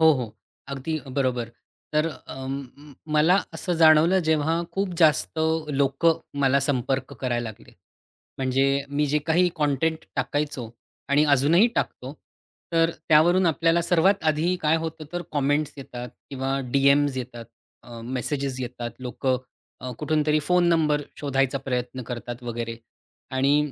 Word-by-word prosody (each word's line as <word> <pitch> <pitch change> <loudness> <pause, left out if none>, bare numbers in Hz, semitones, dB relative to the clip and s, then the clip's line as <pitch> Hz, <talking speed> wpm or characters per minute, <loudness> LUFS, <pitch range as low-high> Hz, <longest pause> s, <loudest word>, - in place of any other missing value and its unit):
हो, 160 -1 +7
हो. 125 -6 -3 0.3
अगदी 140 +4 -3
बरोबर. 130 -3 -1 0.4
तर 155 +1 +2
अ, 140 -4 -10
म 140 +2 -7 0.2
मला 155 +5 +5 0.2
असं 180 - -2
जाणवलं, 160 +4 +6
जेव्हा 160 +2 +2
खूप 195 0 -1
जास्त 160 0 +3 0.4
लोकं 160 +5 +2 0.2
मला 135 0 +3
संपर्क 130 0 -1
करायला 120 -2 -1
लागले. 110 - -13 0.7
म्हणजे 135 +1 +1 0.2
मी 145 +1 +1
जे 150 +2 +1
काही 175 +3 +4
कॉन्टेन्ट 155 +1 0
टाकायचो 145 -6 -2 0.4
आणि 145 +2 +4
अजूनही 160 - +5
टाकतो. 130 +3 -3 0.6
तर 165 0 +3 0.2
त्यावरून 175 +4 +5
आपल्याला 165 +1 +2
सर्वात 180 +3 +2
आधी 160 +4 +2
काय 155 +1 +3
होतं, 160 -1 -5
तर 175 - -2
कॉमेंट्स 145 +1 0
येतात 125 -2 -7 0.2
किंवा 135 0 -2
डीएमस् 140 0 +3
येतात. 120 -2 -6 0.4
अ, 120 -1 -10
मेसेजेस 130 +2 -3
येतात. 120 -2 -5
लोकं 130 +1 -1 0.4
अ, 125 0 -6
कुठूनतरी 155 -1 +1
फोन 180 +4 +2
नंबर 150 -3 +2 0.2
शोधायचा 135 -1 0
प्रयत्न 125 -1 -3
करतात 120 0 -6
वगैरे. 115 -1 -4 0.6
आणि 140 +2 +2
145 Hz, 135 wpm, -25 LUFS, 130-160 Hz, 0.7 s, हो